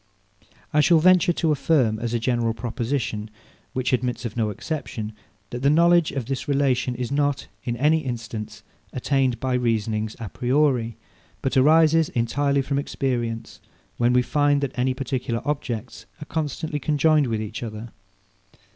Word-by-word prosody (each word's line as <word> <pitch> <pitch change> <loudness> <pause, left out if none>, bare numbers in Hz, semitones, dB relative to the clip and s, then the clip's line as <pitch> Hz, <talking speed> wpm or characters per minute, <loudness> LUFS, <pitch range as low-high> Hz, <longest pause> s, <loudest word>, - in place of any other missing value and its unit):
I 150 - +5
shall 165 +3 +5
venture 180 +1 +5
to 165 -2 0
affirm, 135 -7 +2
as 115 0 -3
a 120 - +1
general 115 -1 0
proposition, 115 -2 -3 0.4
which 130 0 -1
admits 125 0 -1
of 115 - -4
no 110 -3 0
exception, 110 -3 -5 0.4
that 120 - -5
the 140 - +4
knowledge 170 +1 +4
of 135 -4 -3
this 135 +1 -4
relation 135 -3 +1
is 125 +1 -4
not, 145 0 0 0.2
in 120 -1 -2
any 150 +5 +3
instance, 115 -5 -6 0.3
attained 130 -2 0
by 130 +1 -1
reasonings 110 -3 0
a 115 - -5
priori; 125 -1 +1 0.5
but 135 - -1
arises 160 +3 +5
entirely 140 +4 0
from 140 +1 -1
experience, 120 -5 -3 0.4
when 120 0 +3
we 125 0 +4
find 145 +1 +2
that 140 -2 -2
any 130 +1 0
particular 125 -3 -3
objects 130 -5 -4
are 150 - -7
constantly 155 0 -3
conjoined 150 0 +3
with 110 -2 -1
each 110 -1 -5
other. 110 0 -6
130 Hz, 155 wpm, -24 LUFS, 115-145 Hz, 0.5 s, I